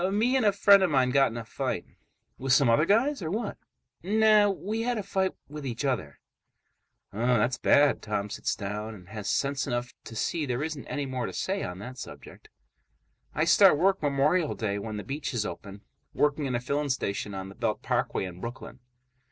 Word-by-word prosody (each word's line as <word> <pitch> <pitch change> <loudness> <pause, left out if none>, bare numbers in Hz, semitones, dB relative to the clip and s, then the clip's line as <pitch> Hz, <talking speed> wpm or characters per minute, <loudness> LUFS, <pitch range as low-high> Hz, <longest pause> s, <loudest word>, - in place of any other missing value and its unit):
"Me 230 +6 +2
and 260 - +2
a - - +6
friend 200 0 +6
of 190 - +3
mine 130 -3 +2
got 135 +1 +4
in 115 - -7
a 115 - -6
fight." - - -3 0.5
"With 130 -1 +1
some 130 -2 +5
other 135 +7 +4
guys 240 - +2
or 160 - -3
what?" 210 +4 -3 0.4
"Nah. 215 +2 +4
We 205 +3 -3
had 240 0 -1
a 210 - -3
fight 190 -1 0
with 150 +1 -8
each 125 +1 -3
other." 110 - -2 1.0
"Um, 115 +4 -1
that's 120 +4 0
bad." 145 -1 +4
Tom 105 -1 -2
sits - - -2
down 105 +2 -5
and 90 -3 -15
has 105 -2 -5
sense 140 -1 0
enough 120 -1 -3
to 115 - -9
see 150 +6 -1
there 125 +2 -1
isn't 155 -3 -5
anymore 130 -4 -3
to - - -7
say 195 +1 -2
on 90 - -5
that 125 +6 -8
subject. - - -11 0.9
"I 155 - +2
start 175 0 +6
work 190 +4 +2
Memorial 150 +3 +1
Day, 100 -2 -2
when 110 +1 -5
the 105 - -5
beaches 135 -6 -3
open. 100 +1 -7 0.3
Working 150 0 +1
in 125 - -1
a - - +1
filling 145 +4 -2
station 100 -5 -2
on 95 0 -6
the - - -10
Belt - - -2
Parkway - - 0
in 90 0 -9
Brooklyn." 120 +2 -7
135 Hz, 200 wpm, -28 LUFS, 115-185 Hz, 1.0 s, a